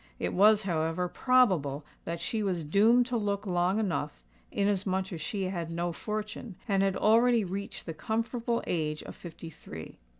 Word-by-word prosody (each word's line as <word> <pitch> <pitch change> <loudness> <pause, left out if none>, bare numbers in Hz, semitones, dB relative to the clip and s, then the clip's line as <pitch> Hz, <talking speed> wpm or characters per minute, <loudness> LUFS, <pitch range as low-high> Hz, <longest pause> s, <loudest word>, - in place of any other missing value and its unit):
It - - -2
was, 210 +3 +6
however, 165 -1 0
probable 180 - +2 0.2
that 170 0 -3
she 220 +4 -2
was 185 -5 -1
doomed 220 +10 +4
to 245 -1 -1
look 205 -1 -1
long 180 +1 +1
enough, 190 - -1 0.3
inasmuch 190 -1 0
as 165 - -5
she 195 +5 -2
had 175 -3 -3
no 170 +1 -2
fortune, 215 +3 -5
and 195 -2 +2
had 195 -1 +2
already 230 +1 +4
reached 195 +2 -5
the 165 - -4
comfortable 230 +4 -1
age 155 -3 -1
of - - -9
fifty 165 -1 -9
three. 80 - -10
195 Hz, 165 wpm, -29 LUFS, 170-215 Hz, 0.3 s, was